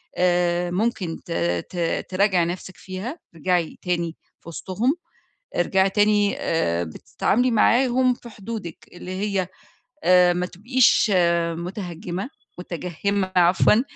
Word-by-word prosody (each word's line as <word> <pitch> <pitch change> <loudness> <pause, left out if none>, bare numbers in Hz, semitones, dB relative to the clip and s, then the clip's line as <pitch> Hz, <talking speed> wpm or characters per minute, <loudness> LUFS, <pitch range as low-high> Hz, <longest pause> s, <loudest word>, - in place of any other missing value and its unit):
آآ 175 -1 +1
ممكن 185 -4 -1
ت - - -9 0.4
ت 170 -2 -1
تراجَعي 185 -2 +2
نَفْسِك 180 +2 -6
فيها، 200 - -6 0.2
ارجعي 170 0 0
تاني 170 -2 -1 0.2
في - - -12
وِسطهم، 205 - -1 0.6
ارجعي 190 +2 +2
تاني 205 0 +3
آآ 85 - 0
بتتعاملي 230 - 0
معاهم 250 +2 +3
في 240 - -13
حدودِك، 210 -5 -7
اللي 180 +1 -9
هي 200 -3 -1 0.6
آآ 180 -1 +6
ما 180 0 -1
تبقيش 230 +3 +3 0.5
متهجمة 180 - -5 0.3
متجهمة 185 +2 -2
عفوًا، 180 +5 +5
185 Hz, 110 wpm, -23 LUFS, 175-210 Hz, 0.6 s, آآ